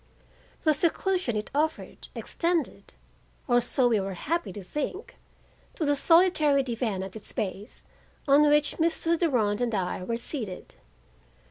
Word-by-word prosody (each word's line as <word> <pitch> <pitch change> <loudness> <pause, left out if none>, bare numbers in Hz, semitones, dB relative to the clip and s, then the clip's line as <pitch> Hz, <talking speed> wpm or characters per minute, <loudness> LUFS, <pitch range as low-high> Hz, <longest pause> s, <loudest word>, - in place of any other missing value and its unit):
The 310 - +4
seclusion 340 - 0
it 210 - -4
offered 310 +2 -2
extended, 340 -2 -2 0.5
or 245 -2 +4
so 245 +1 +2
we 225 -3 +3
were 195 -1 -4
happy 335 - -2
to 205 - -8
think, 300 - -5 0.6
to 315 - -2
the 290 0 +2
solitary 310 -3 +4
divan 230 -6 -2
at 190 +1 -8
its 215 - -8
base 200 0 -4 0.4
on 280 +1 +6
which 295 0 +2
Mr. 330 0 +2
Durand 245 - +1
and 235 -3 0
I 185 -1 -2
were 230 +5 -2
seated. 225 -7 -5
275 Hz, 140 wpm, -27 LUFS, 215-320 Hz, 0.6 s, on